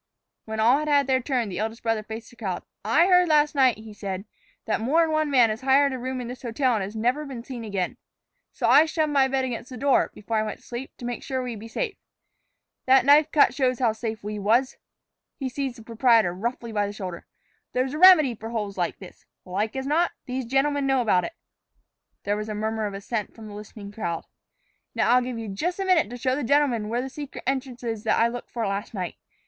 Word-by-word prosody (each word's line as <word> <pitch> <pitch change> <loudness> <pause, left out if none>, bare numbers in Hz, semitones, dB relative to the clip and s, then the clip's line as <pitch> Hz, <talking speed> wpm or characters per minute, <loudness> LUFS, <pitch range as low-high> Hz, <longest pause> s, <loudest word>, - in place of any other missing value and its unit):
When 220 0 -5
all 240 +6 +5
had 305 - -3
had 285 -1 +4
their 260 0 +2
turn, 245 -3 -1
the 180 -1 -5
eldest 220 +2 -4
brother 225 -2 0
faced 220 +1 -8
the - - -17
crowd. 190 -6 -4 0.2
"I 230 - +4
heard 360 -1 +5
last 300 -1 +3
night," 260 -5 +4
he 215 0 -11
said, 195 -1 -5 0.4
"that 220 0 -1
more 300 +9 +3
'n 320 - -1
one 310 -1 +1
man 245 -5 +5
has 215 +3 -5
hired 270 +1 +4
a 260 - -4
room 260 +1 -3
in 245 - -5
this 250 +1 -8
hotel 250 +1 0
and 205 0 -3
never 245 +7 0
been 260 -5 -7
seen 245 -2 -7
again. 200 -4 -3 0.5
So - - -3
I 310 - +7
shoved 310 -1 0
my 275 -2 +4
bed 265 0 0
against 245 -1 -5
the 255 - -8
door, 275 +2 +3
before 220 +2 -3
I - - +3
went 215 0 -4
to - - -23
sleep, 245 +2 -6
to 245 - -8
make 245 0 -4
sure 260 -1 -3
we'd 240 -4 -5
be 225 - -9
safe. 420 - -3 0.9
That 260 0 +6
knife 290 +2 +6
cut 295 - +5
shows 255 -3 +1
how 235 -3 +2
safe 220 -1 -5
we 210 0 -4
was." 235 +6 +2 0.6
He 265 -2 -3
seized 265 -1 -3
the 225 - -12
proprietor 230 -4 +3
roughly 235 +4 -4
by 205 -2 0
the 205 - -6
shoulder. 185 -5 -7 0.5
"There's 260 +2 0
a 305 - -4
remedy 340 -8 +8
for 225 0 -8
holes 210 -4 -4
like 175 - -1
this. 185 - -14 0.2
Like 205 +5 -2
as 265 0 -3
not, 320 +5 +1
these 255 -1 -3
gentlemen 275 +3 +1
know 270 -1 +3
about 190 -6 +2
it." 335 - -6 0.9
There 205 - 0
was 215 +1 -4
a 215 - -3
murmur 220 0 -1
of 200 - -6
assent 210 +1 -4
from 225 - -11
the 210 - -9
listening 205 0 -9
crowd. 170 -6 -4 0.7
"Now - - +2
I'll 250 +1 +5
give 250 -1 -4
you 225 -1 -5
jus' 310 - -2
a 390 - -2
minute 360 - +3
to 245 - -7
show 255 +1 0
the 290 - -3
gentlemen 250 -5 +2
where 240 +2 -1
that 265 - -6
secret 290 0 -8
entrance 260 -2 -3
is 225 -3 -3
that - - +2
I 230 - +4
looked 240 0 -7
for 230 -2 -3
last 200 +2 -3
night. 180 -3 -4
240 Hz, 240 wpm, -25 LUFS, 215-270 Hz, 0.9 s, remedy